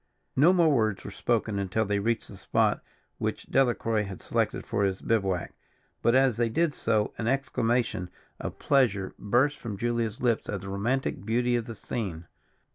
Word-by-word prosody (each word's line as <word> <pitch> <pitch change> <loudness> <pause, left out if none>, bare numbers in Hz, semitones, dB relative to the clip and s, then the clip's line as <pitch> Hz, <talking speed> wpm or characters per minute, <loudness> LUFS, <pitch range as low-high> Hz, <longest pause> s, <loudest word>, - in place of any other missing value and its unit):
No 150 +7 +6
more 170 -4 +4
words 110 -6 +1
were - - -6
spoken 110 -3 0
until 100 +3 0
they 100 0 0
reached 115 +3 -1
the - - -10
spot - - +1 0.4
which - - -2
Delacroix 120 -4 +2
had 95 -2 -7
selected - - -1
for 100 - 0
his 95 -1 0
bivouac; 95 -5 0 0.5
but, 115 - +3
as 130 -4 +4
they 120 -1 +2
did 165 +5 +1
so, 110 -5 0
an 115 - -1
exclamation 120 -7 0 0.3
of - - -5
pleasure 110 -9 +2
burst 125 +8 +2
from 105 -4 -5
Julia's 115 -1 -1
lips 120 -3 0
at 100 -3 -3
the 100 - -7
romantic 110 +3 -1
beauty 120 +3 +1
of 120 -2 -2
the 115 - -6
scene. 90 -10 -4
115 Hz, 175 wpm, -28 LUFS, 100-125 Hz, 0.5 s, No